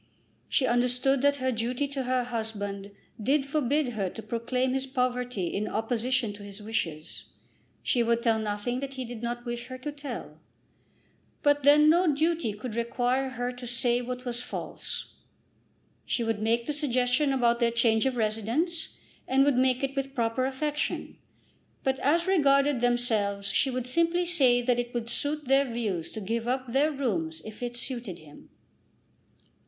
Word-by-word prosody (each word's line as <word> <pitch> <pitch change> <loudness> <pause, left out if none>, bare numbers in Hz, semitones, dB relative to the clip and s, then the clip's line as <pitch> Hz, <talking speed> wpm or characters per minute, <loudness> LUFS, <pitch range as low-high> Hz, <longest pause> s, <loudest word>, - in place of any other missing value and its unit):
She 270 - +2
understood 250 +2 +2
that 285 0 +4
her 260 -2 0
duty 245 +4 -1
to 270 -2 -3
her 255 0 +1
husband 205 -4 -4 0.3
did 270 +5 +2
forbid 290 -1 +1
her 205 -5 -2
to 220 - -9
proclaim 250 +3 -1
his 270 0 -1
poverty 250 -5 -1
in 200 +5 -2
opposition 235 +1 0
to 205 - -11
his 200 0 -9
wishes. 170 -8 -4 0.6
She 245 - +2
would 235 0 +1
tell 225 -2 +3
nothing 215 +3 -2
that 275 0 -5
he 260 -1 -4
did 235 -1 -7
not 240 +1 -4
wish 240 0 -4
her 255 0 -7
to 295 +3 -5
tell, 285 -1 -7 1.0
but 290 0 +4
then 295 +2 +6
no 340 +1 +5
duty 320 -5 +1
could 215 +3 -6
require 245 +3 0
her 245 -1 -3
to 250 0 -8
say 240 0 +2
what 250 +1 -5
was 240 -1 -2
false. - - -5 0.9
She 235 - -1
would 225 -2 -1
make 230 +2 +1
the 300 - -2
suggestion 265 -1 +2
about 240 -3 +2
their 235 -1 +3
change 230 0 +3
of 255 -2 -1
residence, 235 - -1 0.3
and 270 +1 +4
would 285 - +4
make 255 +1 +2
it 275 0 -1
with 275 0 -3
proper 235 +1 +1
affection; 295 +2 -2 0.6
but 265 -1 0
as 335 +5 +2
regarded 280 -7 +3
themselves 220 -5 +1
she 265 - +2
would 255 -1 -2
simply 335 +6 +2
say 260 -9 +4
that 245 0 +2
it 245 0 -4
would 235 0 -2
suit 295 +3 -1
their 270 0 +3
views 205 -8 -2
to 220 - -5
give 230 +4 -2
up 255 +1 0
their 270 +5 +2
rooms 185 - -2
if 215 +1 -9
it 240 0 -3
suited 240 -8 -3
him. 150 -2 -15
Mr. - - -38
245 Hz, 170 wpm, -28 LUFS, 230-270 Hz, 1.0 s, then